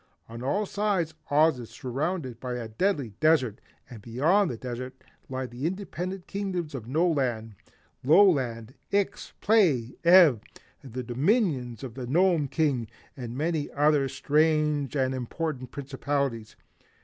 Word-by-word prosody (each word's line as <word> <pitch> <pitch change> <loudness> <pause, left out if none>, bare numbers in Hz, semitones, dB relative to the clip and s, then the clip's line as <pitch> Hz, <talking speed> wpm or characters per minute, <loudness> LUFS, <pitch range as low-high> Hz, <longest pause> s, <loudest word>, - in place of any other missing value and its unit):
On 115 +1 -9
all 195 +12 0
sides, 195 -6 -1 0.2
Oz 150 -1 +4
is 115 -2 -8
surrounded 130 +2 -3
by 125 0 -4
a 120 -2 -5
deadly 140 - -1
desert 150 -9 +2 0.3
and 115 -5 -11
beyond 155 - +2
the 120 - -4
desert 125 +1 -6 0.3
lie 130 0 -3
the 125 +4 -4
independent 185 0 -5
Kingdoms 185 -6 -4
of 120 -5 -6
No 160 +8 +2
Land, 120 -8 -1 0.5
Low 165 +10 +7
Land, 125 - -1 0.2
Ix, 200 +1 -1
Play, 160 - +3
Ev, 170 - +7 0.4
the 130 -1 -6
Dominions 130 - 0
of 125 -4 -6
the 125 0 -6
Gnome 170 +1 +3
King, 135 -6 0 0.3
and 120 -2 -6
many 155 0 -1
other 145 -1 +3
strange 150 -2 +1
and 130 -1 +1
important 130 +1 -4
Principalities. 140 -4 -3
140 Hz, 135 wpm, -27 LUFS, 125-170 Hz, 0.5 s, Low